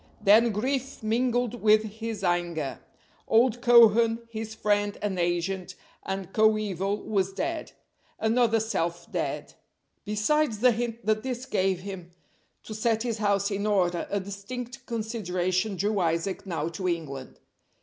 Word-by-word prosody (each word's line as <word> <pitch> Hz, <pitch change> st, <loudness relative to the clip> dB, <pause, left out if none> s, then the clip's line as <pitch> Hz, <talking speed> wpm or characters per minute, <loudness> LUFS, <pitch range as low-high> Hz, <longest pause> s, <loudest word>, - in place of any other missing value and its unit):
Then 220 Hz, +3 st, +5 dB
grief 260 Hz, +4 st, -2 dB
mingled 245 Hz, +1 st, 0 dB
with 215 Hz, 0 st, +5 dB
his 220 Hz, -1 st, -6 dB
anger. 175 Hz, -5 st, -1 dB, 0.5 s
Old 240 Hz, +1 st, +3 dB
Cohen, 230 Hz, -1 st, +5 dB
his 220 Hz, -1 st, -5 dB
friend 205 Hz, -1 st, 0 dB
and 195 Hz, -3 st, -2 dB
agent 175 Hz, +2 st, -1 dB, 0.3 s
and 195 Hz, -1 st, -5 dB
coeval, 210 Hz, -2 st, +1 dB
was 195 Hz, -2 st, 0 dB
dead. 325 Hz, +8 st, -3 dB, 0.4 s
Another 225 Hz, 0 st, +2 dB
self 175 Hz, -6 st, -2 dB
dead. -, -, -3 dB, 0.5 s
Besides 215 Hz, +5 st, +1 dB
the 250 Hz, +4 st, +5 dB
hint 235 Hz, 0 st, -3 dB
that 215 Hz, 0 st, +2 dB
this 255 Hz, 0 st, -4 dB
gave 190 Hz, -5 st, 0 dB
him 190 Hz, -3 st, -7 dB, 0.5 s
to 215 Hz, -, -8 dB
set 220 Hz, +1 st, 0 dB
his 230 Hz, -3 st, -2 dB
house 200 Hz, -1 st, +1 dB
in 200 Hz, +1 st, -1 dB
order, 180 Hz, -4 st, +1 dB
a 200 Hz, -, 0 dB
distinct 240 Hz, +6 st, -7 dB
consideration 200 Hz, -4 st, -1 dB
drew 205 Hz, +2 st, 0 dB
Isaac 170 Hz, +3 st, -1 dB
now 160 Hz, -4 st, -2 dB
to 185 Hz, +2 st, -4 dB
England. 150 Hz, -7 st, -4 dB
210 Hz, 135 wpm, -27 LUFS, 190-230 Hz, 0.5 s, Then